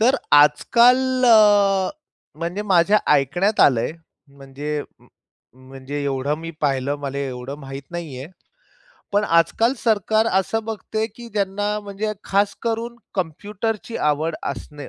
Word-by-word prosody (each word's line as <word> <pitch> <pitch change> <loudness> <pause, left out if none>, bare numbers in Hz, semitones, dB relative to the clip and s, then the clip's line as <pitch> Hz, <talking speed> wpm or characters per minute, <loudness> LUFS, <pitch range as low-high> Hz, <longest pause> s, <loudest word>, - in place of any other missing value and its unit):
तर 255 +5 +4 0.2
आजकाल 245 - +4
अ, 205 -4 +5 0.5
म्हणजे 175 +5 -3
माझ्या 195 +1 +3 0.2
ऐकण्यात 175 - +1
आलंय, 125 0 +3 0.4
म्हणजे 140 +2 -6 0.7
म्हणजे 135 +2 -7
एवढं 140 +1 -1
मी 165 +1 -7
पाहिलं, 140 -1 0
मले 140 0 -4
एवढं 125 +2 -6
माहीत 135 -1 -8
नाहीये, 155 -6 -6 0.9
पण 205 +1 +2
आजकाल 175 - +2
सरकार 220 0 +1
असं 195 +4 0
बघते, 220 0 -3
की 235 +2 -12
ज्यांना 205 +1 -1
म्हणजे 205 +1 -4
खास 200 +1 +1
करून 230 +1 -3 0.2
कम्प्युटरची 205 +6 -4
आवड 155 +2 0
असणे, 145 +3 -6
185 Hz, 115 wpm, -21 LUFS, 145-215 Hz, 0.9 s, अ